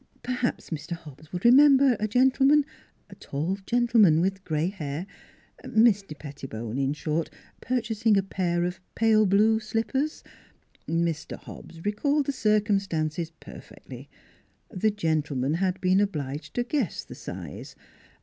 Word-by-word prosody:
Per 250 - -4
haps 250 -6 -2
Mr. 160 +2 -4
Hobbs 155 -2 -11
would 180 +3 -5
remember 270 +1 +7
a 215 - 0
gentleman 265 +5 +4 0.5
a - - -8
tall 165 +8 -3
gentleman 230 -9 +4
with 190 +2 -1
gray 160 0 -1
hair; 160 -3 -5 0.6
Mr. 205 -8 +2
Pettibone, 130 -5 -6
in 135 0 +1
short, 155 +2 -2 0.3
purchasing 225 -3 +1
a 195 - +2
pair 175 -3 -1
of 180 +1 -3 0.2
pale 220 -2 +4
blue 215 +3 +4
slip 225 +1 -2
pers 290 +3 -2 0.6
Mr. 165 -1 -2
Hobbs 165 +1 -12
recalled 280 +8 +1
the 280 - 0
circumstances 195 - 0
per 165 - -12
fectly. - - -12 0.6
The 210 +3 +1
gentleman 155 -8 -1
had 185 +2 0
been 185 +1 +3
obliged 150 -7 -3
to 245 - +1
guess 245 - -2
at - - -25
the - - -7
size. - - -8
195 Hz, 140 wpm, -26 LUFS, 160-225 Hz, 0.6 s, remember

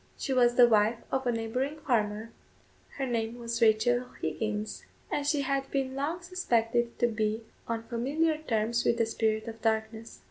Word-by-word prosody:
She 270 - -2
was 240 -1 +4
the 245 -1 +8
wife 220 0 +3
of 265 -1 0
a - - +3
neighbouring 250 +6 -2
farmer; 220 -4 0 0.7
her 270 - -1
name 230 -1 -2
was 235 0 -4
Rachel 235 +3 +3
Higgins; 215 -1 -3 0.3
and 285 -1 -1
she 290 -1 +2
had 275 0 -1
been 270 -1 -1
long 310 +6 -2
suspected 240 -10 0
to - - +3
be 220 -1 -1 0.2
on 230 -1 -2
familiar 290 +7 0
terms 235 -5 0
with 235 - +2
the 230 - +3
spirit 220 0 0
of 225 0 -7
darkness. 220 0 -2
235 Hz, 170 wpm, -29 LUFS, 225-265 Hz, 0.7 s, the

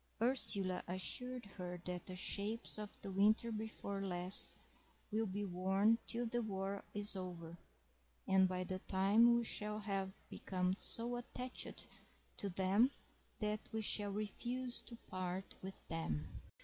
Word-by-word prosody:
Ursula 210 -6 +6
assured 245 +7 0
her 180 -3 -6
that 180 -1 -4
the 185 - -5
shapes 210 +4 -2
of 210 -1 -6
the 195 - -4
winter 215 +4 +4
before 215 -2 -4
last 180 0 +1 0.6
will 220 +1 +1
be 200 +2 -2
worn 195 +5 +3
till 240 +1 0
the 240 +1 0
war 195 -2 -3
is 205 0 +2
over, 175 -3 -5 0.7
and 190 0 +6
by 185 0 -2
that 185 +1 -5
time 205 +5 +5
we 235 - +1
shall 210 -1 -1
have 195 -2 -2
become 185 -1 -1
so 240 +1 -1
attached 250 +1 -5 0.5
to 200 - -2
them 195 +7 +4 0.5
that 210 0 0
we 220 0 -1
shall 205 0 +2
refuse 240 +5 -3
to 235 - -10
part 185 +1 -4
with 190 +1 -8
them. 160 - -3
200 Hz, 140 wpm, -39 LUFS, 185-220 Hz, 0.7 s, Ursula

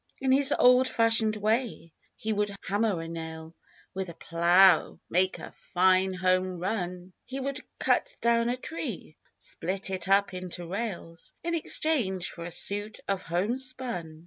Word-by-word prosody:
In 265 -1 +1
his 275 +1 +4
old 250 +1 +6
fashioned 225 -2 +2
way 215 -5 -1 0.2
he 220 0 -2
would 205 -1 -1
hammer 205 -3 +1
a - - -7
nail, 160 -1 -7 0.4
With 190 -1 -4
a 170 - -9
plow 170 +2 +4
make 185 +2 +2
a - - -9 0.2
"fine 185 +1 +4
home 185 0 +1
run," 180 -1 -3
He 265 +2 -6
would 275 +1 -3 0.2
cut - - +1
down 235 0 +2
a 250 - -1
tree, 250 - -6 0.2
split 190 +3 -5
it 190 0 -4
up 200 0 +3
into 180 -1 -6
rails, 175 -4 -5
In 340 0 -2
exchange 260 - 0
for 170 - -8
a - - -5
suit 200 +5 -3
of 195 -1 -1
"home 190 +10 -1
spun.' 240 -12 -4
195 Hz, 155 wpm, -28 LUFS, 175-235 Hz, 0.4 s, old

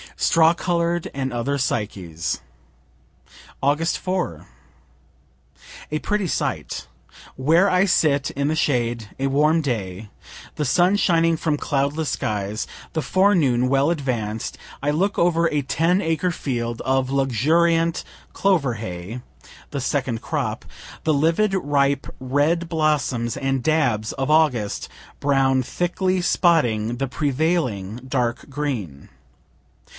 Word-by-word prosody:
STRAW 165 0 +4
COLOR'D 170 -1 -1
AND 135 -1 -2
OTHER 120 +4 -1
PSYCHES 95 -10 -2 1.2
Aug. 150 +5 +1
4. 180 - -3 1.5
A 155 - 0
pretty 205 +5 -1
sight! - - -3 0.5
Where 165 +9 +3
I 185 +1 +3
sit 150 -7 +2
in 140 +1 -1
the 155 - +1
shade 120 -7 0
a 135 - +1
warm 150 +4 +3
day, 105 - -4 0.5
the 150 - -1
sun 180 +8 +3
shining 165 -4 +3
from 155 -2 0
cloudless 145 +2 -1
skies, 105 -3 -2 0.3
the 160 - 0
forenoon 150 -7 +3
well 135 +3 +3
advanc'd 120 -9 -2 0.2
I 145 - 0
look 185 +7 0
over 170 -1 +3
a 150 - +1
ten 165 +7 +1
acre 165 +1 0
field 120 -7 -3
of 130 -1 +1
luxuriant 165 +6 +2 0.3
clover 165 -11 +1
hay, 105 +2 -6 0.5
(the 140 -2 -4
second 130 -4 -1
crop) - - -3 0.4
the 155 - +2
livid 165 +8 +2
ripe 140 -5 +1
red 145 +6 +1
blossoms 145 -7 0
and 135 -1 -1
dabs 125 -8 +1
of 135 +2 -1
August 135 -10 +2 0.3
brown 135 -2 +2
thickly 180 +6 -1
spotting 120 - +2
the 135 +2 -1
prevailing 130 - -1
dark 125 -1 -1
green. 125 - -4
140 Hz, 120 wpm, -22 LUFS, 120-165 Hz, 1.5 s, STRAW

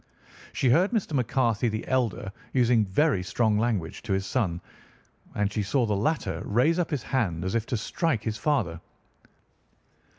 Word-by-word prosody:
She 130 - +1
heard 180 +9 +4
Mr. 220 -9 -1
McCarthy 120 -3 +1
the 110 0 -4
elder 120 -6 0 0.2
using 120 -4 +3
very 135 - +2
strong 105 +3 +1
language 110 -8 -1
to 100 - -2
his 95 0 0
son, 100 -8 -1 0.8
and 105 -1 0
she 105 - 0
saw 115 +6 +1
the 105 -2 0
latter 150 +11 -1
raise 135 - +2
up 175 - 0
his 145 -5 -2
hand 95 -10 -1
as 95 - -2
if 115 -1 -1
to 120 - -1
strike 125 - -1
his 110 -1 -2
father. 95 - 0
115 Hz, 165 wpm, -27 LUFS, 100-130 Hz, 0.8 s, heard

